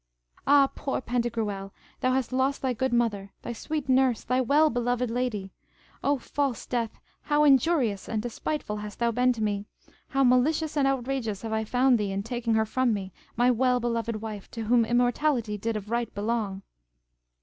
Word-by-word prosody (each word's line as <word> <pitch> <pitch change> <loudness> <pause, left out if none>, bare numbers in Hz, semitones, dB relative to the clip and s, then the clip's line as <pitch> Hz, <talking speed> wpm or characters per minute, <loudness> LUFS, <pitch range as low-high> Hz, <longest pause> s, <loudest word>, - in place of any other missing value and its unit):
Ah, 280 0 +6
poor 275 - -2
Pantagruel, 225 -6 -2 0.3
thou 255 0 +1
hast 260 -1 -1
lost 265 +2 0
thy 260 -1 +1
good 260 +2 -1
mother, 215 -5 0
thy 240 - -4
sweet 300 +4 -4
nurse, 260 -3 +3
thy 255 +1 +1
well 295 +5 +4
beloved 245 0 0
lady! 230 -6 -2 0.5
O 285 0 +2
false 270 -1 -2
death, 235 -3 -2 0.2
how 295 0 +2
injurious 270 - +3
and 220 - -1
despiteful 240 0 -3
hast 210 0 -7
thou 235 0 +1
been 250 +2 +3
to 225 -3 -2
me! 205 -1 -1 0.4
How 270 0 +1
malicious 290 +5 +2
and 280 -2 +3
outrageous 250 -6 -2
have 225 -1 -3
I 220 0 0
found 250 +1 +3
thee 205 -2 -1
in 195 +1 -2
taking 230 0 -1
her 220 0 +3
from 240 +1 +1
me, 190 -2 -6 0.2
my 245 +1 +4
well 250 +1 +2
beloved 230 -1 -1
wife, 210 -3 -6
to 230 - -5
whom 235 +1 +3
immortality 245 -1 +1
did 225 +2 -2
of 210 +1 -8
right 235 0 -1
belong! 205 -2 -2
240 Hz, 180 wpm, -27 LUFS, 220-260 Hz, 0.5 s, Ah